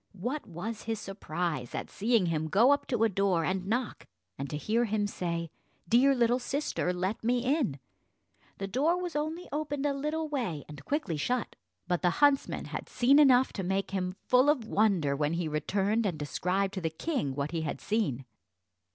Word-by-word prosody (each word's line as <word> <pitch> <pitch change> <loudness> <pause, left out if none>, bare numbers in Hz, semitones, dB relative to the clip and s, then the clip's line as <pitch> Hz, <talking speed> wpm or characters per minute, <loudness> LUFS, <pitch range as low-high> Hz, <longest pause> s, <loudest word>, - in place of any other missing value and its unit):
What 245 +10 -4
was 210 +5 -5
his 225 -1 -2
surprise 170 - -4
at - - -5
seeing 220 -1 +2
him 160 -2 -1
go 220 - +5
up 285 - +1
to 240 -4 +1
a - - +6
door 195 -5 +1
and 185 0 -1
knock, 240 +2 -2 0.3
and 140 0 -5
to 150 - -3
hear 225 +9 +1
him 210 -1 0
say, 170 -4 -3 0.4
"Dear 265 +7 +5
little 240 0 +3
sister, 275 -8 -1
let 185 +5 -2
me 245 +2 +1
in." 260 - +1 0.8
The 195 - -3
door 290 - +1
was 355 -3 -4
only 315 +4 -2
opened 290 -1 -2
a 285 - +2
little 300 +3 -2
way, 235 - -3
and 145 -2 -10
quickly 285 - -1
shut; 245 - -1 0.3
but 175 -2 0
the 180 - +3
huntsman 285 -2 +3
had - - -6
seen 270 +4 +4
enough 260 -3 +5
to 195 - -3
make 190 +2 -1
him 185 -1 -2
full 255 +3 +4
of 275 -7 +2
wonder, 195 -10 +2
when 150 +2 0
he 170 -1 -1
returned 195 +8 0
and 175 -5 -2
described 185 +6 -1
to 190 - -4
the 165 - 0
king 160 - -2
what 140 +2 -2
he 165 -1 -2
had 155 - -3
seen. 190 - -1
205 Hz, 190 wpm, -30 LUFS, 170-260 Hz, 0.8 s, a